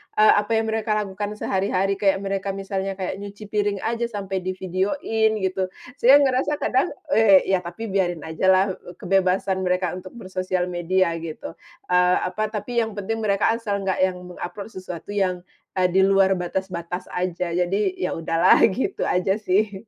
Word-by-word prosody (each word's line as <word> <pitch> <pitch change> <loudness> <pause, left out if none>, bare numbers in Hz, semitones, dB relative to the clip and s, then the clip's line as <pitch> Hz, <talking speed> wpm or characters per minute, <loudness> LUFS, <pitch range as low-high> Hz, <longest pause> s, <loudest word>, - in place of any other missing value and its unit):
eee, 215 0 +6
apa, 210 +2 -4
yang 220 0 0
mereka 220 -1 0
lakukan 205 +2 -5
sehari-hari, 195 -1 0
kayak 195 -1 +2
mereka 195 0 -2
misalnya 195 0 -3
kayak 190 0 -4
nyuci 200 +1 -9
piring 205 -2 0
aja 235 +1 -1
sampai 195 -4 -4
di-video-in 190 +4 -1
gitu. 190 0 0 0.3
Saya 260 +4 +7
ngerasa 265 +3 +1
kadang, 265 +7 +1 0.2
eee, 205 -6 +6
ya 190 -1 +1
tapi 180 +5 -7
biarin 175 -5 0
aja 160 +4 -2
lah, 190 +1 +5
eee, 180 -1 -11
k - - -19
kebebasan 190 0 +1
mereka 180 -1 +1
untuk 185 +4 -12
bersosial 185 -3 -2
media 175 +1 +1
gitu, 165 - -7 0.4
eee, 180 0 +4
apa, 210 +4 -1
tapi 215 +3 -2
yang 220 -2 -2
penting 215 +3 -3
mereka 210 -1 +2
asal 225 -3 -2
enggak 190 -1 -1
yang 185 -1 +2 0.2
meng-upload 200 +5 -7
sesuatu 185 0 -8
yang, 185 -3 -1 0.4
eee, 180 - +4
di 190 +2 +4
luar 195 -1 +4
batas-batas 180 0 -4
aja, 180 -1 -2
jadi 180 +3 +1 0.2
ya 180 - -2
udahlah 165 0 +3
gitu 265 - -2
aja 185 +2 +1
sih. 205 +1 +1
195 Hz, 170 wpm, -23 LUFS, 185-210 Hz, 0.4 s, Saya